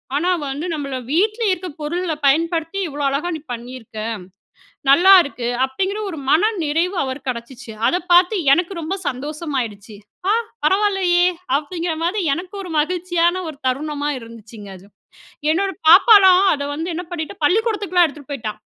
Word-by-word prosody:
ஆனா, 345 Hz, +6 st, +1 dB, 0.2 s
வந்து 285 Hz, +5 st, -4 dB
நம்மள 285 Hz, -4 st, -4 dB
வீட்ல 425 Hz, -, +1 dB
இருக்க 370 Hz, 0 st, -2 dB
பொருள்ள 340 Hz, +3 st, -2 dB
பயன்படுத்தி, 330 Hz, +5 st, +1 dB
இவ்வளோ 290 Hz, -1 st, -5 dB
அழகா 290 Hz, +6 st, -2 dB
நீ 315 Hz, -, -6 dB
பண்ணியிருக்க, 240 Hz, -2 st, -8 dB, 0.9 s
நல்லாருக்கு. 335 Hz, -6 st, +5 dB, 0.2 s
அப்டிங்கிற 380 Hz, +10 st, -3 dB
ஒரு 320 Hz, -, -7 dB
மனநிறைவு 350 Hz, -2 st, +1 dB
அவருக்கு 265 Hz, 0 st, -5 dB
கடைச்சுச்சு. 235 Hz, 0 st, -7 dB, 0.2 s
அத -, -, +2 dB, 0.2 s
பார்த்து 360 Hz, +4 st, +5 dB, 0.2 s
எனக்கு 350 Hz, +4 st, 0 dB
ரொம்ப 325 Hz, +5 st, -3 dB
சந்தோஷமாகிடுச்சு. 255 Hz, -7 st, -4 dB, 0.3 s
"ஆ, -, -, +4 dB, 0.3 s
பரவாயில்லையே!" 380 Hz, -2 st, +2 dB, 0.3 s
அப்டிங்கிற 330 Hz, +3 st, -4 dB
மாதி 385 Hz, +5 st, 0 dB
எனக்கு 365 Hz, +3 st, -8 dB
ஒரு 360 Hz, -3 st, -8 dB
மகிழ்ச்சியான 350 Hz, +2 st, 0 dB
ஒரு 305 Hz, -, -10 dB
தருணமா 290 Hz, +2 st, -2 dB
இருந்துச்சுங்க, 225 Hz, -3 st, -12 dB
அது. 190 Hz, -, -18 dB, 0.7 s
என்னோட 390 Hz, +3 st, 0 dB, 0.2 s
பாப்பாலாம், 385 Hz, -2 st, +7 dB
அத 285 Hz, -, -5 dB
வந்து 325 Hz, +4 st, -4 dB
என்ன 360 Hz, -, -4 dB
பண்ணிட்டு, 345 Hz, +3 st, -5 dB
பள்ளிக்கூடத்துக்குலாம் 395 Hz, -1 st, +2 dB
எடுத்துட்டு 285 Hz, -1 st, -11 dB
போய்ட்டா. 225 Hz, -6 st, -4 dB
330 Hz, 135 wpm, -20 LUFS, 275-365 Hz, 0.9 s, பாப்பாலாம்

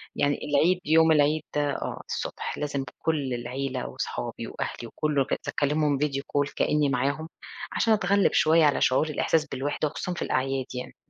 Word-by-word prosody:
يعني 145 Hz, 0 st, +1 dB
العيد، 165 Hz, +5 st, +3 dB
يوم 160 Hz, +1 st, +5 dB
العيد 150 Hz, 0 st, +3 dB
آه، 145 Hz, -1 st, -2 dB
الصبح -, -, -4 dB
لازم 140 Hz, -2 st, -2 dB, 0.2 s
كُلّ 145 Hz, -6 st, -1 dB
العيلة 125 Hz, +2 st, -3 dB
وصحابي -, -, -4 dB
وأهلي 120 Hz, -, -5 dB
وكلُّه، 150 Hz, +2 st, 0 dB
أكز -, -, -2 dB
أكلِّمهم 145 Hz, -1 st, +1 dB
video 140 Hz, -2 st, 0 dB
call 145 Hz, 0 st, -1 dB
كأني 150 Hz, -2 st, +2 dB
معاهم، 140 Hz, +5 st, -1 dB, 0.4 s
عشان 225 Hz, -1 st, +3 dB
أتغلِّب 200 Hz, -2 st, +2 dB
شوية 160 Hz, 0 st, +5 dB
على 145 Hz, -, +2 dB
شعور 130 Hz, +5 st, +3 dB
الإحساس 155 Hz, +1 st, +1 dB
بالوحدة، 145 Hz, +3 st, -2 dB
وخصوصًا 180 Hz, +4 st, -4 dB
في -, -, -6 dB
الأعياد 135 Hz, 0 st, -1 dB
يعني. 125 Hz, -, -6 dB
145 Hz, 155 wpm, -26 LUFS, 135-155 Hz, 0.4 s, يوم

